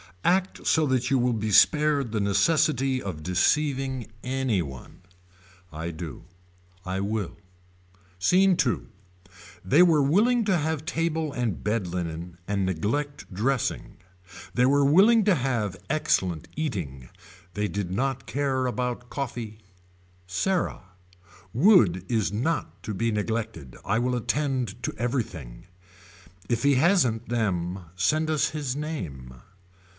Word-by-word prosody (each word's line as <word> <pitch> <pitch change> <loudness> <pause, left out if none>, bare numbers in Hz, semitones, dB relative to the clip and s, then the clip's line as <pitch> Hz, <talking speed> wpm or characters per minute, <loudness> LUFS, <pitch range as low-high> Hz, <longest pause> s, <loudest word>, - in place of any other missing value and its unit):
Act 185 +1 +1
so 160 -1 +4
that 130 -1 +1
you 135 - +3
will 125 0 +2
be 110 -1 -2
spared 145 +2 +4
the 110 - -1
necessity 130 +5 +2
of 80 -6 -6
deceiving 130 - 0
anyone. 105 - -3 0.7
I 80 +2 -5
do. 80 -1 -8 0.6
I 95 +1 -2
will. 100 -1 -3 0.8
Scene 185 - +4
II. 120 - 0 0.8
They 145 +7 +5
were 165 -4 +4
willing 215 - +3
to 190 -3 +2
have 155 -1 -2
table 160 -3 -1
and 120 - -2
bed 105 -2 0
linen 85 -1 -5
and 100 -2 0
neglect 115 - -2
dressing. 120 +6 -1 0.6
They 125 - +3
were 140 +1 +4
willing 205 +10 +6
to 205 -3 +4
have 120 - -1
excellent 95 - 0
eating. 85 - -4 0.5
They 105 0 0
did 100 -3 -4
not 135 +6 -2
care 135 -2 0
about 125 0 -3
coffee. 120 -6 -5 0.7
Sarah. 175 - -1 0.7
Wood 110 - +5
is 110 -3 0
not 105 - -2
to 105 - -4
be 115 +4 0
neglected. 110 - -3
I 115 - +1
will 125 +1 0
attend 125 -3 -1
to - - -2
everything. 105 - -4 0.8
If 115 -1 0
he 140 -1 +4
hasn't 130 - +2
them 95 -6 -1
send 155 +12 +1
us 155 -2 +2
his 145 -4 -3
name. 85 - -5
120 Hz, 125 wpm, -26 LUFS, 95-145 Hz, 0.8 s, willing